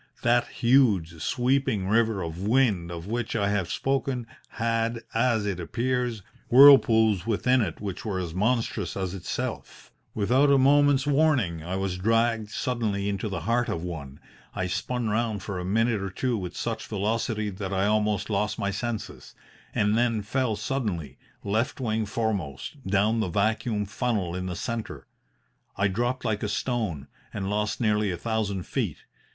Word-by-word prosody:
That 120 0 +3
huge, 105 -11 +2
sweeping 125 -6 +1
river 110 -2 +2
of 85 +1 -5
wind 105 -6 +2
of 85 -1 -6
which 115 +3 -3
I 100 -2 +1
have 100 -4 -1
spoken 135 -2 -1 0.2
had, 115 0 -1
as 115 -2 +2
it 100 -3 -2
appears, 120 +3 -1 0.3
whirlpools 115 -7 +7
within 125 +3 +2
it 85 -7 -3
which 100 -3 -5
were 100 -4 -2
as 85 -3 -4
monstrous 105 -3 0
as 95 -2 -2
itself. 95 -3 -5 0.2
Without 125 +7 +3
a 140 - +6
moment's 140 0 +4
warning 140 - +2
I 90 +3 -3
was 95 -1 -2
dragged 115 +1 +1
suddenly 105 -5 -1
into 100 +2 -2
the 95 -4 -4
heart 120 +7 0
of 85 - -3
one. 75 -6 -7 0.4
I 90 - -1
spun 110 +7 -2
round 110 -2 -1
for 100 -3 -4
a - - -4
minute 110 +2 +1
or 100 - -3
two 125 +6 -1
with 90 -4 -5
such 115 -1 -3
velocity 110 +1 -1
that 95 0 -5
I 95 0 +1
almost 105 -1 +1
lost 105 0 -1
my 100 0 -1
senses, 115 +2 -5 0.4
and 105 +1 +2
then 115 -2 +1
fell 125 +1 0
suddenly, 90 - -3 0.2
left 110 +7 -1
wing 110 -3 -1
foremost, 110 - -3
down 105 +4 +2
the 110 - 0
vacuum 110 +2 0
funnel 100 -4 -2
in 90 0 -3
the 90 - -4
centre. 115 +4 -5 0.7
I 100 0 +3
dropped 120 +5 -1
like 110 -2 0
a 105 - -2
stone, 105 - -2 0.3
and 95 -1 -3
lost 105 0 -1
nearly 105 -2 +2
a 90 - -2
thousand 105 -4 -2
feet. - - -2
105 Hz, 160 wpm, -26 LUFS, 95-120 Hz, 0.7 s, whirlpools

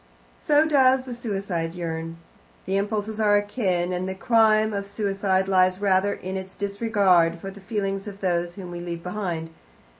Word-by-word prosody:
So 300 +1 +3
does 265 -3 +4
the 255 -1 -7
suicide 195 -8 -3
yearn. 165 -1 -4 0.5
The 190 - -1
impulses 210 +2 -2
are 205 -1 +4
akin, 190 -4 -1
and 180 +1 -2
the 190 - -4
crime 215 0 +3
of 200 0 -3
suicide 195 -2 0
lies 185 -1 +3
rather 200 0 +2
in 185 +1 -6
its 190 0 -8
disregard 200 -5 +2
for 195 +3 -7
the 200 +1 -13
feelings 195 -1 -3
of 200 -1 -8
those 175 -2 -1
whom 185 -3 -8
we 175 - -6
leave 170 -1 -6
behind. 180 -4 -4
195 Hz, 170 wpm, -24 LUFS, 180-210 Hz, 0.5 s, does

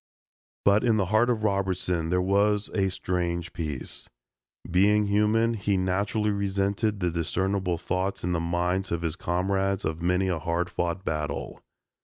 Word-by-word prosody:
But 100 +1 +5
in 115 -3 +3
the 100 - +2
heart 120 +3 +4
of 115 -3 0
Robertson 95 -4 0
there 90 +1 +2
was 100 +2 +2
a 95 -2 +2
strange 85 -2 -2
peace. 75 -5 -5 0.6
Being 105 +4 +4
human, 105 +3 +2
he 100 -2 0
naturally 100 +3 0
resented 100 +1 0
the 90 -1 +1
discernible 90 +2 -1
thoughts 95 +3 -2
in 90 - 0
the 85 - +1
minds 90 +3 -1
of 85 0 -1
his 80 -1 -1
comrades 95 +2 0
of 80 +1 -2
many 90 +2 +1
a 90 -3 0
hard 85 +3 -1
fought 85 +2 -2
battle. 75 -2 -3
95 Hz, 155 wpm, -27 LUFS, 85-100 Hz, 0.6 s, But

